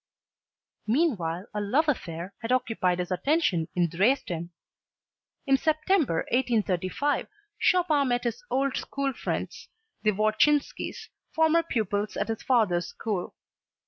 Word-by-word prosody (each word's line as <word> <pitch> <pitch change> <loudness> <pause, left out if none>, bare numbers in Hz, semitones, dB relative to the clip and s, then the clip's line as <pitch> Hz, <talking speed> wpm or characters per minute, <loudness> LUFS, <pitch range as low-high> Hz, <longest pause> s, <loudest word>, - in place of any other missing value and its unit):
Meanwhile 205 - 0
a 210 - -2
love 270 +11 +2
affair 180 - -3
had 230 +1 -3
occupied 225 -8 +1
his 180 0 -3
attention 185 - +1
in 175 -1 +3
Dresden. 175 - 0 1.0
In 270 -1 +4
September, 310 - +1
1835, 235 +2 0 0.3
Chopin 320 -6 +3
met 245 -1 0
his 250 - -3
old 270 0 0
school 280 -1 -2
friends, - - -4 0.3
the 215 - +2
Wodzinskis, 215 +8 +1 0.3
former 320 +1 +4
pupils 210 - -2
at - - -1
his 225 - -3
father's 195 -9 +2
school. 205 -6 -4
230 Hz, 115 wpm, -27 LUFS, 185-285 Hz, 1.0 s, In